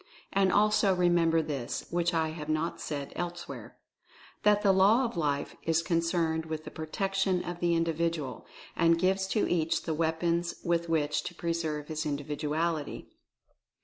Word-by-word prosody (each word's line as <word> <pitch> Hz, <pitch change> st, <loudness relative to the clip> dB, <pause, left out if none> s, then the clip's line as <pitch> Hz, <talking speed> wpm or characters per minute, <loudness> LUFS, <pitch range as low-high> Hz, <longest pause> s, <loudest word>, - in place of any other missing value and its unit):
And 195 Hz, -1 st, +3 dB
also 210 Hz, -1 st, +4 dB
remember 170 Hz, -2 st, +3 dB
this, 140 Hz, -6 st, -4 dB
which 175 Hz, 0 st, +1 dB
I 160 Hz, -2 st, +1 dB
have 155 Hz, -1 st, -7 dB
not 155 Hz, +2 st, -1 dB
said 145 Hz, -2 st, -4 dB
elsewhere, 175 Hz, 0 st, -6 dB, 0.6 s
that 210 Hz, 0 st, +4 dB
the 200 Hz, -, +5 dB
Law 200 Hz, +7 st, +5 dB
of 235 Hz, -, -4 dB
Life 145 Hz, -4 st, -1 dB
is 165 Hz, 0 st, +1 dB
con 170 Hz, -1 st, +1 dB
cerned 165 Hz, -1 st, 0 dB
with 155 Hz, -1 st, -4 dB
the -, -, -8 dB
Protection 190 Hz, +3 st, -1 dB
of 175 Hz, 0 st, -5 dB
the 175 Hz, -1 st, +2 dB
Individual, 165 Hz, -3 st, -1 dB, 0.3 s
and 165 Hz, -1 st, +4 dB
gives 190 Hz, +2 st, +1 dB
to 210 Hz, +2 st, +1 dB
each 165 Hz, -2 st, 0 dB
the 160 Hz, -, -2 dB
weapons 165 Hz, +2 st, 0 dB
with 170 Hz, -1 st, 0 dB
which 150 Hz, -2 st, +1 dB
to 175 Hz, -, -6 dB
preserve 160 Hz, -3 st, -2 dB
his 155 Hz, -1 st, -3 dB
Individuality. 150 Hz, +2 st, -2 dB
165 Hz, 155 wpm, -29 LUFS, 155-175 Hz, 0.6 s, the